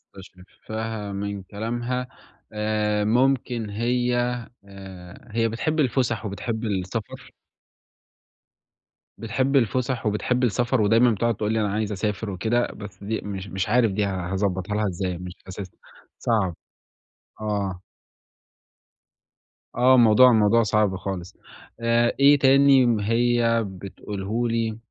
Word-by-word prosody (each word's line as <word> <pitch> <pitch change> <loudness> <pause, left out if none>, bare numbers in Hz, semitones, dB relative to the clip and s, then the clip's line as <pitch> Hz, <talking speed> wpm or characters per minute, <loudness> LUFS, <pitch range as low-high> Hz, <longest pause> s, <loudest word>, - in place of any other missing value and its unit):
مستشفّها 105 +3 -7
من 100 0 -4
كلامها 120 +5 -3 0.5
آآ، 105 0 0
ممكن 120 -1 +1
هي 120 +3 0 0.5
آآ، 95 +2 -12
هي 115 +1 +1
بتحب 155 +8 -2
الفًسَح 120 -5 0
وبتحب 110 +3 -4
السفر. 100 0 -4 1.9
بتحب 130 +5 -1
الفُسح 125 0 0
وبتحب 115 +4 0
السفر، 120 +1 +1
ودايمًا 115 +4 +4
بتُقعد 115 +2 0
تقول 105 +1 -1
لي 110 - +1
أنا 105 -2 -1
عايزة 105 0 -1
أسافر 105 +2 -3
وكده، 110 +6 0
بس 100 -2 -10
دي 110 +2 -2
مش 100 -1 -6
مش 95 0 -3
عارف 115 -1 +3
دي 105 +1 0
ه 95 -2 -3
هاضَبّطها 95 0 -1
لها 105 0 +1
إزاي 90 -1 -3
مش 90 0 -8
أساسًا، 95 0 -8 0.4
صعب. 100 -7 0 0.9
آه. 100 -4 -2 2.0
آه، 130 +1 +5
الموضوع 120 +1 +7
الموضوع 110 +1 +4
صعب 105 -2 +1
خالص. 95 -1 -6 0.4
آآ، 115 0 +2
إيه 140 +1 +6
تاني 135 -1 +5
م 115 -3 +2
هي 115 +1 +2
بتقوله 100 +4 -4
لي 115 -1 -1
110 Hz, 120 wpm, -24 LUFS, 100-120 Hz, 2.0 s, الموضوع